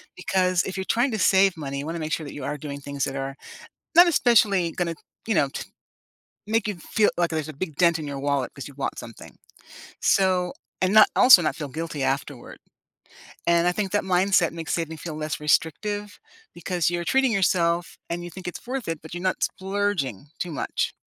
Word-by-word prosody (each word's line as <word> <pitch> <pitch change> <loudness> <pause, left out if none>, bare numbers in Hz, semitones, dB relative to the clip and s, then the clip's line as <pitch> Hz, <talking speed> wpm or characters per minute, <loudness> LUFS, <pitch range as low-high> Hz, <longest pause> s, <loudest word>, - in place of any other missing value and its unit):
because 185 -1 +1
if 190 0 -5
you're 190 - -3
trying 245 +3 +2
to 220 - -2
save 190 -1 +4
money, 140 -2 -4
you 140 - -5
wanna 165 +1 -4
make 155 0 -4
sure 160 - -2
that 145 - -8
you 145 - -7
are 145 +1 -3
doing 140 -1 -7
things 140 -1 -4
that 135 - -5
are 135 0 -4 0.6
not 350 +1 +9
especially 210 - +3
gonna, 170 -1 -2 0.3
you 220 - +2
know, 140 - +3
t - - -6 0.8
make 220 -1 +1
you 210 - -2
feel 210 +5 +1
like 175 -1 +2
there's 155 -1 -2
a - - -7
big 155 +1 -5
dent 170 -2 +3
in 150 - -5
your 140 -1 -5
wallet 140 -3 -1
‘cause 140 - -7
you 140 - -12
want 135 - -3
something, 115 - -11 0.6
so 185 -2 +2 0.3
and 185 +1 +2
not 215 -1 +8
also 250 -8 +8
not 155 -3 -1
feel 150 -3 -6
guilty 155 -1 -4
afterward, 135 0 -3 0.9
and 170 0 +4
I - - +4
think 195 -2 -2
that 205 - +1
mindset 185 -2 +2
makes 165 -2 -4
saving 160 -1 -3
feel 155 -1 -6
less 155 0 -4
restrictive 205 +7 -1 0.3
because 175 -1 -1
you're 175 0 -3
treating 265 +2 +3
yourself 175 -4 +1
and 175 +1 -3
you 175 - -7
think 185 +1 -10
it's 180 - -7
worth 260 -4 -4
it, 165 -2 -4
but 160 - -11
you're 175 +1 -5
not 185 - -1
splurging 190 - -2
too 175 - -3
much. - - -2
170 Hz, 210 wpm, -24 LUFS, 150-190 Hz, 0.9 s, not